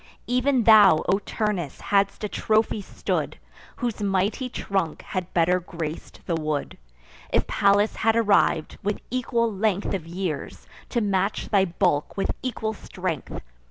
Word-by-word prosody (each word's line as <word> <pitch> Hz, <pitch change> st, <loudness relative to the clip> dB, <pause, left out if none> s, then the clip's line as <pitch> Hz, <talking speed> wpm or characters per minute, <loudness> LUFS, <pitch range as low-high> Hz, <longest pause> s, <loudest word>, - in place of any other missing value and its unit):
Even 250 Hz, 0 st, +2 dB
thou, 205 Hz, -7 st, +7 dB
O 195 Hz, -, +3 dB
Turnus, 200 Hz, -, -3 dB
hadst 200 Hz, +1 st, +1 dB
a -, -, 0 dB
trophy 215 Hz, +1 st, +1 dB
stood, -, -, -3 dB, 0.4 s
Whose 240 Hz, -4 st, -3 dB
mighty 200 Hz, +6 st, 0 dB
trunk 195 Hz, -8 st, -2 dB
had 185 Hz, -1 st, -4 dB
better 180 Hz, +1 st, +3 dB
grac'd 165 Hz, -3 st, -7 dB
the 170 Hz, -, -1 dB
wood, 155 Hz, -3 st, -2 dB, 0.5 s
If -, -, +2 dB
Pallas 205 Hz, +1 st, +2 dB
had 225 Hz, 0 st, +2 dB
arriv'd, 205 Hz, -8 st, +2 dB
with 205 Hz, +1 st, -2 dB
equal 235 Hz, -2 st, 0 dB
length 200 Hz, 0 st, 0 dB
Of 175 Hz, -5 st, -3 dB
years, 175 Hz, -3 st, -4 dB, 0.2 s
to 240 Hz, -, 0 dB
match 200 Hz, -1 st, 0 dB
thy 200 Hz, -3 st, +4 dB
bulk 170 Hz, -4 st, 0 dB
with 195 Hz, -, 0 dB
equal 220 Hz, -4 st, -2 dB
strength. -, -, -5 dB
200 Hz, 140 wpm, -25 LUFS, 180-220 Hz, 0.5 s, thou